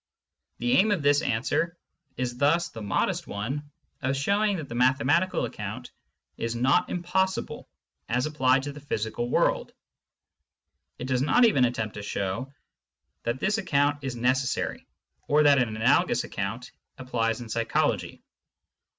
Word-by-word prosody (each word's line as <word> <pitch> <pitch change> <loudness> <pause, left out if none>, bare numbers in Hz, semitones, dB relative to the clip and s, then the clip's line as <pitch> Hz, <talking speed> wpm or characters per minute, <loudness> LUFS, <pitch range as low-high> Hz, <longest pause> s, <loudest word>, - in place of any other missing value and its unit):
The 120 0 -1
aim 205 +4 +4
of 195 -8 0
this 145 +1 +4
answer 165 +9 -1 0.4
is 125 -1 -3
thus 165 +5 +3
the 115 - -9
modest 100 -2 -1
one 135 +9 -4 0.3
of 135 0 0
showing 200 +7 +1
that 155 -4 -6
the 120 - -8
mathematical 140 +8 +2
account - - -6 0.5
is 115 0 -3
not 125 +4 +2
im 175 - -3
possible 190 +2 -1 0.4
as 125 +2 +1
applied 135 -3 +2
to 145 - -4
the 145 - -10
physical 120 -3 -3
world; - - +1 1.2
it 125 - -5
does 130 -1 0
not 195 - +5
even 140 - +4
attempt 115 -3 -2
to 105 - -7
show 100 +6 -3 0.7
that 120 +2 -1
this 210 +6 +1
account 145 -5 +1
is 130 -2 -3
necessary, 130 +2 -1 0.4
or 150 +1 +4
that 145 -2 +6
an 125 -3 +1
analogous 110 +1 +3
account - - -5 0.3
applies 115 -3 -1
in 120 - -7
psychology. 115 +1 -1
130 Hz, 145 wpm, -27 LUFS, 120-150 Hz, 1.2 s, that